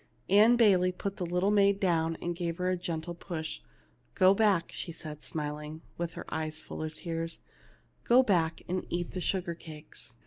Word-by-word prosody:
Ann 215 Hz, +4 st, +7 dB
Bayley 190 Hz, -6 st, +5 dB
put 195 Hz, +2 st, -5 dB
the 180 Hz, -, -2 dB
little 180 Hz, +4 st, +1 dB
maid 200 Hz, -1 st, +4 dB
down 165 Hz, -4 st, +1 dB
and 175 Hz, 0 st, -1 dB
gave 170 Hz, -1 st, -3 dB
her 185 Hz, 0 st, 0 dB
a -, -, +2 dB
gentle 170 Hz, -1 st, -4 dB
push. 160 Hz, -, -5 dB, 0.3 s
" -, -, -37 dB
Go 185 Hz, +1 st, +6 dB
back," 200 Hz, -5 st, +2 dB
she 170 Hz, -, -4 dB
said, 155 Hz, -2 st, -8 dB
smiling, 150 Hz, +1 st, -5 dB
with 170 Hz, 0 st, -3 dB
her -, -, -7 dB
eyes 155 Hz, -1 st, -2 dB
full 155 Hz, -, -7 dB
of 155 Hz, 0 st, -4 dB
tears; 165 Hz, 0 st, -4 dB, 0.6 s
"go 250 Hz, +2 st, +6 dB
back, 170 Hz, -7 st, +1 dB
and 185 Hz, +1 st, -2 dB
eat 175 Hz, 0 st, -2 dB
the 185 Hz, -, -4 dB
sugar 180 Hz, -1 st, -1 dB
cakes." 155 Hz, -6 st, -8 dB
175 Hz, 185 wpm, -30 LUFS, 160-190 Hz, 0.6 s, Ann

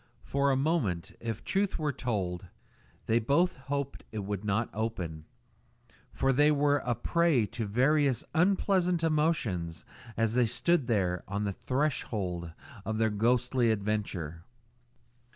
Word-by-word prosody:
For 140 Hz, 0 st, +1 dB
a 135 Hz, -, +3 dB
moment, 130 Hz, -, 0 dB
if 115 Hz, -1 st, -4 dB
truth 195 Hz, 0 st, 0 dB
were 150 Hz, -3 st, -1 dB
told, 95 Hz, -8 st, -3 dB, 0.6 s
they 115 Hz, +1 st, +3 dB
both 145 Hz, +10 st, +2 dB
hoped 140 Hz, +1 st, -4 dB
it 105 Hz, -3 st, -4 dB
would 100 Hz, 0 st, -3 dB
not 105 Hz, +3 st, 0 dB
open, 90 Hz, -8 st, -4 dB, 0.9 s
for 135 Hz, 0 st, +1 dB
they 145 Hz, +3 st, +5 dB
were 145 Hz, -1 st, +3 dB
a 120 Hz, -2 st, -1 dB
prey 170 Hz, -8 st, +2 dB
to 115 Hz, 0 st, -4 dB
various 135 Hz, +3 st, +2 dB
unpleasant 180 Hz, -1 st, +2 dB
emotions 120 Hz, -, 0 dB, 0.3 s
as 115 Hz, -1 st, +1 dB
they 125 Hz, -1 st, +3 dB
stood 150 Hz, +4 st, +2 dB
there 90 Hz, -6 st, 0 dB
on 100 Hz, +2 st, -2 dB
the 100 Hz, -1 st, -1 dB
threshold 105 Hz, -, -2 dB, 0.3 s
of 110 Hz, 0 st, -2 dB
their 110 Hz, -1 st, +2 dB
ghostly 120 Hz, +3 st, +2 dB
adventure. 100 Hz, -6 st, -2 dB
120 Hz, 135 wpm, -30 LUFS, 100-145 Hz, 0.9 s, they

